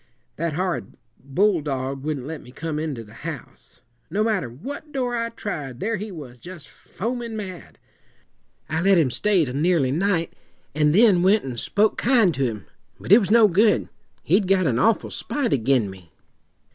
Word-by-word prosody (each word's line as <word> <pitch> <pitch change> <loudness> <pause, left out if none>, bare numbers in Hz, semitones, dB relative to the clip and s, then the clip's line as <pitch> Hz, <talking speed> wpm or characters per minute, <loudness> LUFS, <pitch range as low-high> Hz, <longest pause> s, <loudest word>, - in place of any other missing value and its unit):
"That 165 0 -2
horrid 175 - -3 0.3
bulldog 140 -5 0
wouldn't 145 -4 -3
let 160 +1 -6
me 125 - -14
come 150 +3 -4
into 150 -7 -4
the 105 0 -16
house! 150 -1 -9 0.3
No 210 +2 0
matter 210 - 0
what 280 - -8
door 250 -4 -1
I 230 0 -1
tried, 150 - -6
there 225 +6 -1
he 210 +1 -6
was, 135 -8 -10
just 175 0 -10
foamin' 230 +2 -5
mad. 180 - -8 0.9
I 160 +1 -1
let 195 +1 +4
him 150 -7 +3
stay 195 +2 +2
till 125 - -5
nearly 150 -2 +2
night, 170 +2 0 0.4
and 150 +1 +2
then 205 -4 +5
went 200 +4 +4
and 125 -3 -5
spoke 210 - +1
kind 230 -8 +4
to 135 - -1
him; 110 -5 -4 0.3
but - - -6
it 210 - +9
was 195 - -2
no 225 0 +6
good. 210 +4 +3 0.3
He'd 190 +4 +2
got 190 -1 +3
an 120 -5 +1
awful 225 - +2
spite 245 - -2
ag'in 125 -3 +2
me. 95 -4 -12
170 Hz, 175 wpm, -23 LUFS, 135-210 Hz, 0.9 s, it